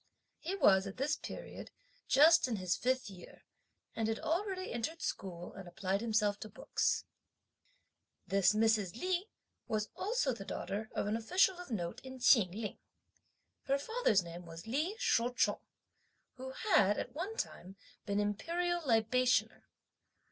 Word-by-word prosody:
He 360 +4 -3
was, 195 - +4
at 195 - -8
this 285 +4 +1
period, - - -8 0.4
just 320 +2 +6
in 240 - -1
his 185 -3 0
fifth 255 0 0
year, 190 -3 -12 0.5
and 225 -1 0
had 225 0 0
already 370 +3 -2
entered 240 +8 -3
school, 180 - -5
and 190 -2 -9
applied 190 +2 -2
himself 215 -3 +1
to 215 - -7
books. 210 - -1 1.2
This 195 0 +3
Mrs. 220 -2 +2
Li 370 +3 -1 0.4
was 215 -1 -1
also 405 - 0
the 205 - -7
daughter 210 +2 -4
of - - 0
an 210 +2 0
official 360 - +2
of 360 - -9
note 175 -7 -3
in 260 0 -8
Chin 235 -6 +5
Ling. 210 +2 -5 0.9
Her 275 +1 +2
father's 280 - +1
name 170 0 -9
was 165 +2 -9
Li 300 - -1
Shou 250 - +1
chung, - - +2 0.7
who 260 +1 -8
had, 205 -5 +3
at - - -4
one 385 +9 -4
time, 190 - -5 0.3
been 200 0 0
Imperial 340 - -1
Libationer. 250 -1 +2
230 Hz, 150 wpm, -34 LUFS, 200-325 Hz, 1.2 s, just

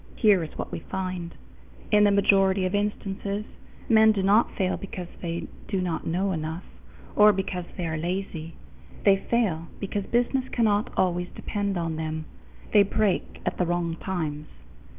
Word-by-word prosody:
Here 205 -6 +5
is 155 - -8
what - - -4
we - - -4
find: 185 -1 -4 0.6
in 210 -1 +6
the - - +6
majority 195 -1 +4
of 185 - -1
instances, 205 0 -2 0.4
men 220 -1 +6
do 200 -3 0
not 205 +4 +4
fail 185 -2 +1
because 185 -2 -6 0.2
they 170 -1 -3 0.2
do 195 - -1
not 180 -3 -2
know 185 +4 0
enough, 160 +1 -3 0.5
or 210 0 +8
because 185 -2 -3
they 180 - -2
are 160 -1 -2
lazy; 170 -2 -4 0.5
they 195 -1 +6
fail 195 -7 0
because 200 0 -3
business 250 +2 +1
cannot 215 -3 +2
always 180 -1 +1
depend 200 -2 -2
upon 165 -2 -2
them 160 0 -3 0.5
they 210 - +8
break 200 -1 0
at - - -2
the 180 - +3
wrong 170 -1 0
times. 155 -5 -3
190 Hz, 160 wpm, -26 LUFS, 170-205 Hz, 0.6 s, or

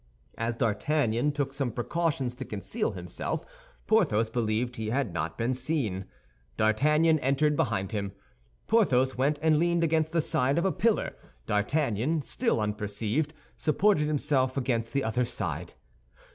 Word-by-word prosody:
As 115 +1 -2
D'Artagnan 120 +3 +1
took 140 -2 -2
some 135 -3 -1
precautions 135 +1 -1
to 130 - -4
conceal 125 - -3
himself, - - -4 0.4
Porthos 115 - +2
believed 120 +1 -1
he 110 -1 -3
had 125 -5 -1
not 80 0 -3
been 120 +2 0
seen. 125 - -2 0.5
D'Artagnan 150 +9 +3
entered 140 +3 +2
behind 100 -7 0
him. 100 -2 -2 0.5
Porthos 135 - +3
went 140 +4 +1
and 155 -1 +4
leaned 170 0 +2
against 160 -1 +1
the 165 - +2
side 135 -2 +1
of 170 - +1
a 190 - +3
pillar. 225 +3 +1 0.3
D'Artagnan, 135 +6 0
still 230 - 0
unperceived, 105 +8 -2 0.2
supported 155 0 +2
himself 140 -3 +1
against 120 -3 -1
the 140 -1 0
other 120 +3 +1
side. 85 - -4
130 Hz, 140 wpm, -28 LUFS, 110-155 Hz, 0.5 s, and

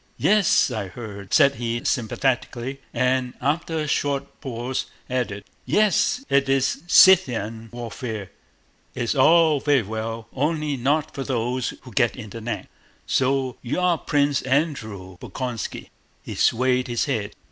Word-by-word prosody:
"Yes, 205 -9 +3
I 110 -4 -3
heard," 100 -2 -9
said 140 -2 +5
he 120 0 -2
sympathetically, 130 +2 -1
and 125 0 0
after 160 +4 -1
a 155 -1 -1
short 140 -1 -2
pause 125 0 -3 0.2
added: 115 -6 -2 0.2
"Yes, 215 +5 +2
it's 135 -1 +2
Scythian 115 - +5
warfare. 115 -3 -6 0.6
It's 120 -2 -1
all 155 +1 +5
vewy 140 -7 +2
well—only 115 +8 -2
not 145 +4 0
for 135 - -4
those 125 -1 -2
who 125 - -11
get 120 +3 +2
it - - -9
in 110 -4 -8
the 115 - -7
neck. 120 +2 -4 0.4
So 130 -1 0
you 130 +7 -2
are 180 -3 +2
Pwince 145 -1 +1
Andwew 110 - -2
Bolkónski?" 125 -3 -5 0.3
He - - -6
swayed 125 +1 +2
his 120 -1 0
head. 110 -7 -2
130 Hz, 135 wpm, -23 LUFS, 115-145 Hz, 0.6 s, said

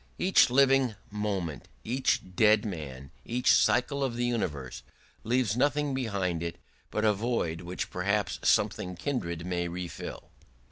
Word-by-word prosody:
Each 190 -7 +5
living 135 -2 +4 0.2
moment, 100 -7 -3 0.2
each 120 -6 -1
dead 105 +1 +5
man, 70 -9 -6
each 125 +2 +2
cycle 140 +3 +3
of 130 -3 -1
the 120 0 0
universe 75 - -3 0.4
leaves 120 -1 +1
nothing 145 +2 +1
behind 100 -10 -1
it 85 0 -3 0.3
but 110 - -1
a 105 - +5
void 100 -7 -1
which 90 +1 -5
perhaps 100 +3 -1
something 90 0 +1
kindred 85 - -3
may 90 -1 -1
refill. 85 0 -7
105 Hz, 135 wpm, -29 LUFS, 85-125 Hz, 0.4 s, Each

